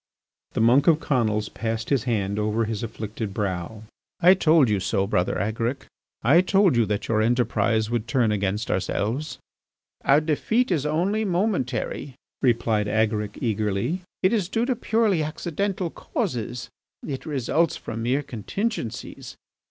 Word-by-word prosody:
The - - 0
monk 125 +5 +4
of 160 -2 +5
Conils 110 -8 0
passed 115 +1 -3
his 135 -5 +2
hand 105 -4 -1
over 110 +2 0
his 110 -1 -3
afflicted 110 -2 -5
brow: 100 +1 -3 0.4
"I 180 +2 +7
told 160 -6 +4
you 105 -2 +1
so, 95 +1 0
Brother 90 -2 0
Agaric; 115 +7 -2 0.4
I 145 +10 +6
told 190 -3 +3
you 115 -2 +3
that 105 0 -2
your 110 -1 +2
enterprise 110 -1 +1
would 120 -1 -1
turn 120 -4 +2
against 100 +1 -1
ourselves." 115 +10 -2 0.7
"Our 140 +2 +5
defeat 190 - 0
is 150 -4 +1
only 185 +8 +1
momentary," 175 - -1 0.3
replied 115 -4 +2
Agaric 105 -1 0
eagerly. 110 - -1 0.2
"It 185 +4 +4
is 200 -6 0
due 225 +3 0
to 255 0 0
purely 220 -6 +1
accidental 175 +4 -2
causes; 120 - -4 0.4
it 140 +2 -5
results 155 +3 +1
from 115 - -6
mere 130 +5 0
contingencies. 130 - -4
120 Hz, 145 wpm, -24 LUFS, 110-165 Hz, 0.7 s, I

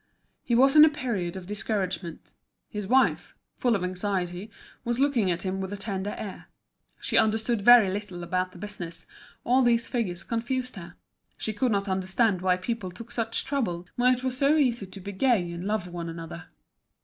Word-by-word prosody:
He 235 - 0
was 270 +4 +5
in 305 - +10
a 315 - +8
period 235 - -3
of 190 -1 -7
discouragement. 195 -4 -3 0.4
His 210 -3 -5
wife, 260 +4 +2 0.2
full 245 -2 +2
of 195 - -2
anxiety, 185 +1 -2 0.3
was 240 +1 -1
looking 265 -8 +2
at 170 -1 -1
him 190 0 -2
with 190 0 -4
a 205 - -4
tender 200 0 -4
air. 200 -3 -7 0.5
She - - +2
understood 220 0 +1
very 240 -1 +8
little 190 -3 -5
about 185 +1 -1
the - - -14
business, 180 -4 -8 0.4
all 255 +2 +3
these 235 -2 +2
figures 190 -8 -2
confused 250 +2 -2
her; 180 -2 -10 0.4
she 220 - -3
could 240 +4 0
not 200 -1 0
understand 190 +1 +1
why 180 -1 +2
people 190 0 -3
took 230 +7 -11
such 230 -1 -2
trouble, 205 -12 -2
when 250 +1 +4
it 250 - -9
was 260 -1 -1
so 280 +4 +3
easy 240 -8 +1
to 195 - -10
be 200 +2 -6
gay 200 -5 +1
and 170 +2 -6
love 210 -3 -1
one 175 -1 -5
another. 165 +1 -8
205 Hz, 185 wpm, -27 LUFS, 185-240 Hz, 0.5 s, in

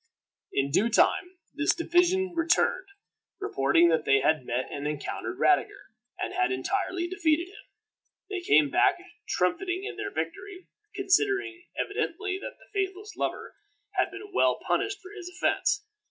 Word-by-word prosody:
In 140 0 0
due 210 +9 +3
time 365 - +2 0.2
this 290 +1 +2
division 355 +2 +2
returned, 335 +3 +2 0.5
reporting 165 - +3
that 160 -2 +2
they 135 -2 +4
had 145 -2 +1
met 125 +2 -1
and 145 +1 -3
encountered 150 -1 -4
Radiger, - - +1 0.3
and - - -3
had 125 +1 +1
entirely 345 - -1
defeated 345 -2 +1
him. 405 - -16 0.6
They 385 -2 -4
came 150 - +4
back - - +4 0.3
triumphing 360 - 0
in - - -6
their - - -3
victory, 390 -2 -6 0.3
considering 390 -2 +1
evidently, 390 -2 -2
that - - -8
the - - -20
faithless 395 +1 -3
lover - - -3 0.4
had 375 -2 +1
been 400 +1 -10
well - - +4
punished 405 0 0
for 375 - -11
his 380 -4 -8
offense. 385 +3 0
360 Hz, 145 wpm, -28 LUFS, -, 0.6 s, they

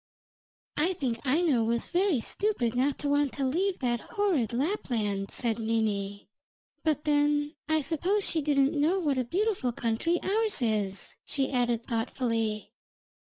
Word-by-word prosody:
'I 335 +5 +2
think 260 -10 -2
Aino 285 -4 +3
was 230 +1 +1
very 355 - +2
stupid 400 - 0
not 265 +3 +1
to 290 - -4
want 285 -1 +2
to 275 - -1
leave 360 +8 0
that 240 -2 +1
horrid 365 - 0
Lapland,' 235 - -1
said 230 -2 -1
Mimi; 210 -3 -1 0.6
'but 300 -2 +1
then 295 0 +2 0.2
I 315 0 +3
suppose 350 +7 0
she 320 - +2
didn't 280 -1 +2
know 310 +5 +2
what 290 -8 0
a - - +1
beautiful 365 - 0
country 235 +10 0
ours 430 0 +1
is,' 210 -5 -2
she 270 -2 -1
added 240 -3 0
thoughtfully. 225 -2 -2
275 Hz, 145 wpm, -28 LUFS, 230-330 Hz, 0.6 s, Aino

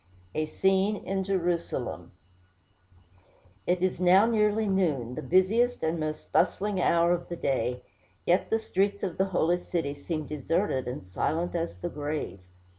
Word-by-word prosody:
A 155 0 -1
SCENE 190 +5 +2
IN 195 0 -1
JERUSALEM 175 -3 -2 1.6
It 180 0 +1
is 185 -1 0
now 185 +3 +6
nearly 215 -1 +2
noon, 155 -11 0
the - - -5
busiest 205 - +2
and 160 +1 0
most 155 0 -4
bustling 200 -2 +1
hour 170 0 +4
of 175 0 -3
the 175 - -3
day; 125 -5 -1 0.4
yet 175 +2 +2
the 225 - +3
streets 200 -2 -1
of 185 -2 -3
the 190 - +4
Holy 175 -2 +1
City 165 -6 -2
seem 155 +2 -4
deserted 150 -1 -1
and 125 -6 -5
silent 160 - -1
as 170 -1 -2
the 175 - -4
grave. 150 - -4
175 Hz, 150 wpm, -28 LUFS, 155-195 Hz, 1.6 s, now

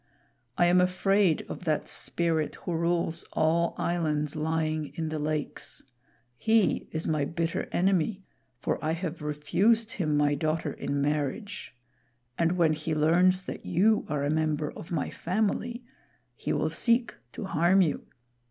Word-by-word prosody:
I 175 - +5
am 180 +1 +5
afraid 185 -1 +2
of - - -7
that 155 -2 0
Spirit 165 -3 0
who - - -6
rules 170 0 0
all 165 +2 +2
islands 150 -4 -1
lying 155 0 -1
in 160 -1 -2
the 155 0 -3
lakes. 150 0 -3 0.6
He 220 -2 +2
is 160 0 -2
my 155 -2 +1
bitter 165 +3 -2
enemy, 190 +2 +1 0.3
for 130 - -2
I 155 +1 +1
have 165 -2 -4
refused 190 +10 +1
him 155 -6 0
my 145 0 +3
daughter 155 +2 -1
in 140 0 -2
marriage; 150 - -2 0.6
and 170 +3 +2
when 170 -3 +3
he 155 +1 -2
learns 180 +5 +3
that - - -7
you 215 +5 +3
are 145 -1 -1
a 145 - +1
member 155 -1 0
of 165 - -10
my 155 -5 -1
family, 220 +6 -1 0.5
he - - -3
will - - 0
seek 235 0 +2 0.2
to - - -5
harm 185 +1 +4
you. 150 -5 -2
165 Hz, 150 wpm, -28 LUFS, 155-185 Hz, 0.6 s, I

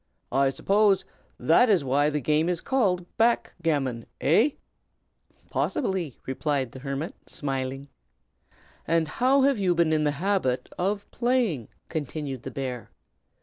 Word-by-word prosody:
I 135 +1 +3
suppose 200 +8 +2 0.3
that 245 - +5
is 190 -8 +4
why 140 +3 +2
the 150 0 -1
game 155 +4 +1
is 175 -2 0
called 195 -10 +1
back 235 +1 +2
gammon, 135 -8 -1
hey?" 220 - +3 0.9
"Possibly!" 190 - -1
replied 130 -1 -1
the 130 - -10
hermit, 140 +4 -4
smiling. 135 -1 -4 1.0
"And 165 -1 +2
how 260 - +3
have 275 -4 +3
you 180 -3 +2
been 165 -2 +3
in 155 -1 +2
the 150 -1 +1
habit 180 -8 0
of 200 +3 -1
playing?" 235 - 0 0.2
continued 145 -4 -4
the 135 - -6
bear. 125 -3 -5
155 Hz, 135 wpm, -26 LUFS, 135-200 Hz, 1.0 s, that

